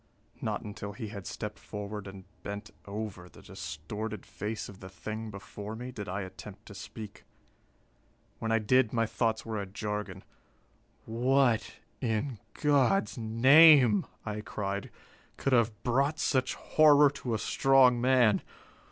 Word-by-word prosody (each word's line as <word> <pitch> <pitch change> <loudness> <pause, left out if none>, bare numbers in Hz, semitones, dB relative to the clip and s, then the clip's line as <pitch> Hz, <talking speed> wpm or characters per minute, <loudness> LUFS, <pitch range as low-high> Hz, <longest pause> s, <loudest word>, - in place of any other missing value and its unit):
Not - - -2
until 105 -1 -7
he 110 0 -6
had 100 -3 -8
stepped 105 -1 -6
forward 105 -1 -6
and 95 -1 -10 0.2
bent 100 +2 -6 0.2
over 100 -3 -6
the - - -16
distorted 105 +8 -6
face 105 +1 -5
of 100 -2 -12
the 95 - -10
thing 110 +3 -6
before 105 +1 -8
me, 125 +3 -6
did 105 -6 -7
I 95 +2 -2
attempt 95 +2 -10
to 105 - -11
speak. 105 0 -9 1.2
When 115 - -2
I 115 - +4
did, 115 +2 +2
my 115 -1 +2
thoughts 110 0 -1
were 110 -2 -3
a 100 - -6
jargon. 105 -1 -5 0.8
"What, 120 0 +2 0.3
in 115 0 -1 0.2
God's 150 +7 +2
name," 125 0 +6 0.2
I 105 -1 -4
cried, 100 -2 -4 0.5
"could 135 - 0
have 115 -2 +4
brought 140 +5 +1
such 130 -4 0
horror 150 -2 +5
to 125 -5 -3
a - - 0
strong 130 0 +4
man? 125 -4 +4
110 Hz, 145 wpm, -30 LUFS, 100-125 Hz, 1.2 s, name